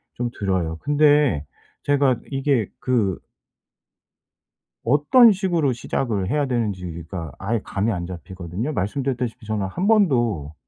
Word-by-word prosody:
좀 120 0 -2
들어요. 90 -5 -1
근데 145 - +3 0.4
제가 140 -3 +2
이게 135 -5 +1
그 110 -8 +1 1.7
어떤 150 - +6
식으로 175 -8 0
시작을 115 -5 -2
해야 145 +1 +1
되는지가 90 - -4
아예 110 +3 -1
감이 105 +4 -1
안 85 -3 -3
잡히거든요. 95 - -5
말씀드렸다시피 125 +1 -2
저는 105 -2 -1
1 180 - -2
번도 120 - +2
115 Hz, 260 characters per minute, -22 LUFS, 95-145 Hz, 1.7 s, 어떤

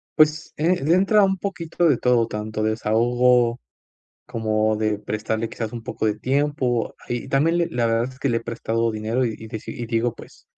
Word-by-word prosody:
Pues, 155 +1 +3
eh, 170 0 +1
le 155 +4 +3
entra 195 +3 +4
un 190 0 +2
poquito 175 -3 -1
de 140 - +3
todo, 120 -2 +2
tanto 110 0 -4
desahogo 120 +3 +2 0.7
como 110 -2 0
de 110 -1 0
prestarle, 110 +2 -3
quizás, 110 -2 -5
un 115 -1 -7
poco 110 - -3
de 105 0 0
tiempo 135 -3 0
y 120 +1 -3
también 155 +6 +2
le 170 - +1
la 120 -1 0
verdad 115 0 +2
es 130 - -16
que 140 - 0
le 115 - +2
he - - -1
prestado 115 0 -1
dinero 110 +4 -1
y 115 -2 -2
y 110 - -10
dici 110 -1 -6
y 120 - -5
digo, 115 0 0
pues - - -14
120 Hz, 200 wpm, -23 LUFS, 110-140 Hz, 0.7 s, entra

